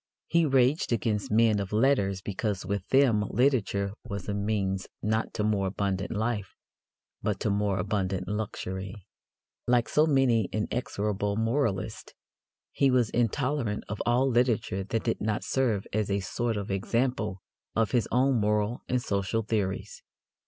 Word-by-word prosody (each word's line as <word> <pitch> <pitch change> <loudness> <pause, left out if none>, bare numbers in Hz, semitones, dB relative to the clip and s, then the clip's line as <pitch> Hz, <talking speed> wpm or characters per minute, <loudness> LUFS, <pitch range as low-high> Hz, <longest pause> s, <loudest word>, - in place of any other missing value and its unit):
He 170 -1 +2
raged 135 +2 +3
against 105 -2 0
men 110 -1 +4
of 100 -1 -4
letters 105 -5 +2
because 100 0 -2
with 100 -1 -3
them 130 -6 +4
literature 105 -5 +1
was 100 -2 -6
a 105 - -1
means 100 -2 -1 0.2
not 110 +1 0
to 105 - 0
more 105 -2 +1
abundant 95 0 -2
life 110 -3 -2 0.7
but 105 -3 -1
to 105 - +1
more 100 -1 +1
abundant 95 -1 -1
luxury. 95 -1 -4 0.6
Like 120 -2 +3
so 155 +1 +3
many 130 -7 +3
inexorable 105 -1 -2
moralists, 115 -3 -1 0.6
he 140 - +3
was 125 -4 +2
intolerant 120 -1 0
of 105 - -4
all 125 +3 +3
literature 120 -6 +1
that 115 +2 -2
did 115 - -1
not 110 0 -1
serve 115 -7 0
as 105 -1 0
a 100 0 +1
sort 115 +4 -2
of 100 -1 -4
example 105 -1 -1 0.3
of 115 0 +2
his 120 -3 +2
own 130 +1 +3
moral 105 +2 0
and 125 - +2
social 100 +3 -1
theories. 105 - -2
105 Hz, 145 wpm, -28 LUFS, 100-120 Hz, 0.7 s, men